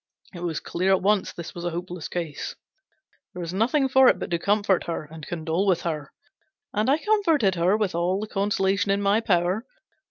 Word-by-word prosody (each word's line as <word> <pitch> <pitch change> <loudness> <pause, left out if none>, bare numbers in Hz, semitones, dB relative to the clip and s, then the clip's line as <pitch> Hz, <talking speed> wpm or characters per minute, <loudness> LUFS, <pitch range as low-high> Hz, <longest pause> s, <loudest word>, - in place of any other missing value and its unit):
It 175 - -8
was 170 -3 -2
clear 185 +3 0
at 190 - +2
once 205 -1 +2
this 170 -1 -8
was 170 - -7
a 175 - 0
hopeless 175 -1 -5
case. 165 -4 -4 0.8
There - - -6
was 170 0 -4
nothing 255 +8 +2
for 265 0 +6
it - - +5
but - - -6
to 170 - +1
comfort 200 0 +1
her 170 -2 -3
and 155 0 -11
condole 170 +3 -1
with 180 -3 +3
her. 155 -4 -3 0.6
And 215 +4 +1
I 285 - +4
comforted 330 - +2
her 180 +4 +2
with 210 -4 -1
all 175 +3 0
the 215 - -3
consolation 200 -1 0
in 200 +1 +1
my 200 +2 +3
power. 185 +1 +1
190 Hz, 200 wpm, -25 LUFS, 170-210 Hz, 0.8 s, for